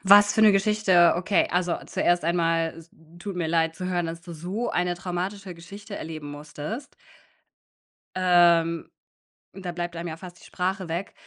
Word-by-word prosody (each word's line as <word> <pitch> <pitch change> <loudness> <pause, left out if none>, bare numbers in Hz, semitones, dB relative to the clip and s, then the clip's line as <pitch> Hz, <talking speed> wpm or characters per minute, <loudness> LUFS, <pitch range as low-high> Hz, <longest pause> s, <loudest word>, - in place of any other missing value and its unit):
Was 205 +1 +7
für 220 - +3
'ne 215 -2 +8
Geschichte. 195 -4 +4
Okay, 185 +3 +2
also, 180 -1 +1
zuerst 175 -1 +1
einmal, 165 -1 +1
s 165 0 -14 0.3
tut 195 0 -6
mir 170 -2 -1
leid 165 0 +1
zu 185 - -4
hören, 175 -2 0
dass 165 +1 -6
du 170 - -9
so 185 +9 -3
eine 180 0 0
traumatische 185 +1 -4
Geschichte 200 +5 -10
erleben 155 -2 -7
musstest. 150 - -7 1.2
Ähm, 170 -2 +3 0.6
da 185 -2 -6
bleibt 175 0 -4
einem 170 0 -4
ja 160 - -6
fast 180 0 -11
die - - -19
Sprache 185 -1 -3
weg. 175 +4 -4
175 Hz, 165 wpm, -25 LUFS, 165-190 Hz, 1.2 s, ne